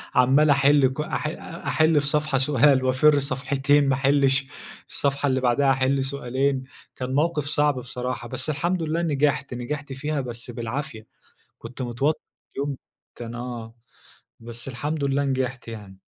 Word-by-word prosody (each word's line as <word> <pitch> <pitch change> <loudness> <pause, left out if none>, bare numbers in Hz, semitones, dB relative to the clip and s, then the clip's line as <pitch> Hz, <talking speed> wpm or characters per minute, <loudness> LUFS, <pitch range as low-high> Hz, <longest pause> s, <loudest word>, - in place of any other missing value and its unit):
عَمّال 135 +5 +5
أحل 140 -1 +5
كل 150 - -3
أح 155 - -3 0.4
أحِل 155 -1 +3
في 140 - -3
صفحة 150 -1 +1
سؤال 135 0 +4
وأفر 140 +3 +4
صفحتين 135 +1 +1
ما 135 - +3
أحلّش، 135 0 +3 0.4
الصفحة 140 0 0
اللي 130 -1 +1
بعدها 135 +2 +3
أحِل 135 +1 +1
سؤالين 135 0 -1 0.3
كان 130 0 -4
موقِف 150 -1 +1
صعْب 145 -1 +2
بصراحة. 125 0 -5
بس 130 +4 -1
الحمد 170 +5 0
لله 160 +2 -1
نجحْت، 145 -4 0
نجحْت 140 +3 -5
فيها 145 +2 -2
بس 120 -1 -6
بالعافية. 115 -1 -5 0.5
كنت 125 +3 -8
متوتر 125 +6 0 0.4
اليوم 140 0 -2 0.4
كان 120 0 -7
آه. 120 -2 -6 0.7
بس 120 +1 -6
الحمد 145 +4 -3
لله 140 +1 +1
نجحْت 130 -2 -2
يعني. 105 -4 -9
135 Hz, 145 wpm, -24 LUFS, 125-145 Hz, 0.7 s, عَمّال